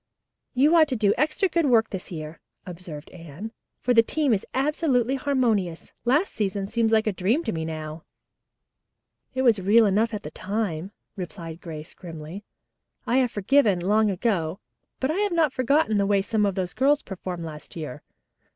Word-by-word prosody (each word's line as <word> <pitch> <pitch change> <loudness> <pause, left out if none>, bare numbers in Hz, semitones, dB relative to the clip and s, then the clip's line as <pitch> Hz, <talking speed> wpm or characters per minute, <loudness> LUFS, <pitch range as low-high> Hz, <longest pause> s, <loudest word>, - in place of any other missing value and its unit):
"You 290 +6 +5
ought 320 -2 +6
to 265 - -1
do 210 -3 +3
extra 310 +6 +1
good 335 -4 +1
work 225 -4 +3
this 190 +1 -6
year," 155 -1 -7 0.3
observed 170 -4 -8
Anne, 170 +5 -9 0.3
"for 250 - +2
the 230 - +7
team 285 +2 +1
is 195 - -1
absolutely 270 -3 +1
harmonious. 235 -11 0
Last 295 +10 +2
season 200 -2 -1
seems 225 +2 0
like 220 -1 +3
a 215 - 0
dream 215 - +1
to 225 - -2
me 160 -1 -3
now." 155 0 -6 1.3
"It 260 - +1
was 230 -5 +4
real 215 +4 +5
enough 210 +3 +2
then," 200 -4 -3 0.2
replied 170 -3 -7
Grace 155 -1 -8
grimly. 165 +2 -9 0.6
"I 245 - +2
have 255 -2 +3
forgiven, 215 -1 +3
long 210 +4 +3
ago, 190 -3 -1 0.4
but 265 +3 0
I 325 - -2
have 410 -3 +1
not 315 -5 +2
forgotten 255 -3 +2
the 200 -1 +2
way 200 -1 +3
some 210 0 +1
of 195 - -2
those 185 -2 -2
girls 285 +3 +2
performed 180 -3 -6
last 150 -2 -9
year. 150 -4 -6
210 Hz, 170 wpm, -25 LUFS, 175-255 Hz, 1.3 s, the